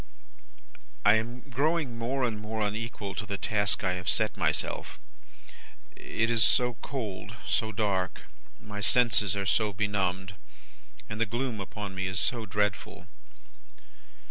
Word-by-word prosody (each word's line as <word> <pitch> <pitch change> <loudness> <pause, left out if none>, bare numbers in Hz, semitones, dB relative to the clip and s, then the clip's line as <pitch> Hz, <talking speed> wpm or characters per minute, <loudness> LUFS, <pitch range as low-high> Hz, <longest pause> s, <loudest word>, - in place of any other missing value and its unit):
"I 105 - +8
am 120 +3 0
growing 145 0 0
more 125 +4 -1
and 115 -4 0
more 110 +1 -4
unequal 105 -1 -3
to 105 +2 -3
the 100 - -2
task 100 0 +1
I 90 -1 +2
have 90 -1 -2
set - - +2
myself. - - -1 1.0
It 115 +1 -1
is 115 -2 +4
so 125 -1 +3
cold, 110 -5 -5
so 110 -1 +1
dark, 100 -3 -1 0.4
my 105 -1 -7
senses 110 -3 +4
are 100 -1 -1
so 105 +2 +2
benumbed, 95 -2 0 0.7
and 105 +2 -4
the 115 - +3
gloom 120 0 -2
upon 100 0 -5
me 95 0 -2
is 95 0 0
so 115 0 0
dreadful. 105 -1 -1
105 Hz, 140 wpm, -29 LUFS, 100-115 Hz, 1.0 s, I